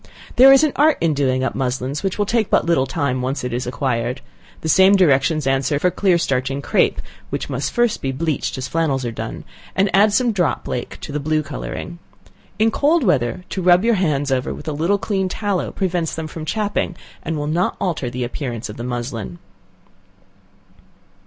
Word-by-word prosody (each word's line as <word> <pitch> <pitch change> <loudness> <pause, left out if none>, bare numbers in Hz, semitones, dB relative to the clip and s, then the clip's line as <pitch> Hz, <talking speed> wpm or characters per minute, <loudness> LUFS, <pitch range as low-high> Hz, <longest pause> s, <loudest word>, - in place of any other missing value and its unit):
There 265 +2 +8
is 270 +2 +7
an 305 - +3
art 305 +1 +4
in 165 -2 +2
doing 130 -2 +1
up 130 - -1
muslins, 130 +2 -2
which 195 -1 -2
will 205 - +1
take 220 0 0
but - - +3
little 165 -6 +2
time 140 -2 -1
when - - -3
once 135 - -5
it 125 -1 -3
is 120 0 -2
acquired. 125 -1 -2 0.4
The - - -4
same 190 +5 +6
directions 155 -4 +3
answer 135 +2 +1
for 180 +5 +1
clear 185 -1 +2
starching 135 -3 -1
crape, - - +1 0.3
(which - - -4
must - - -2
first 240 -2 +1
be 135 - -1
bleached 150 +1 -2
as 130 - -4
flannels 145 -6 0
are 120 - -2
done,) 115 - -6 0.3
and 195 +1 +2
add 205 +2 +5
some 240 +3 +2
drop 180 -6 -1
lake 120 - -4
to - - -7
the 150 - -2
blue 155 +1 0
coloring. 170 +3 -6 0.6
In 220 +1 +3
cold 300 +6 +2
weather, 175 - +1
to 190 - -3
rub 180 +3 +4
your 235 - +4
hands 150 -8 0
over 130 -1 -1
with - - -11
a 155 - -1
little 170 +7 +1
clean 195 -2 -1
tallow 200 -1 -2
prevents 175 -4 -1
them 160 - -4
from 155 0 -7
chapping, 205 0 -1 0.3
and 160 0 -3
will 145 - -2
not 165 +5 0
alter 165 -9 -2
the 125 +1 -4
appearance 120 -2 -4
of 105 - -8
the 120 - -5
muslin. 120 -6 -4
155 Hz, 200 wpm, -20 LUFS, 130-190 Hz, 0.6 s, There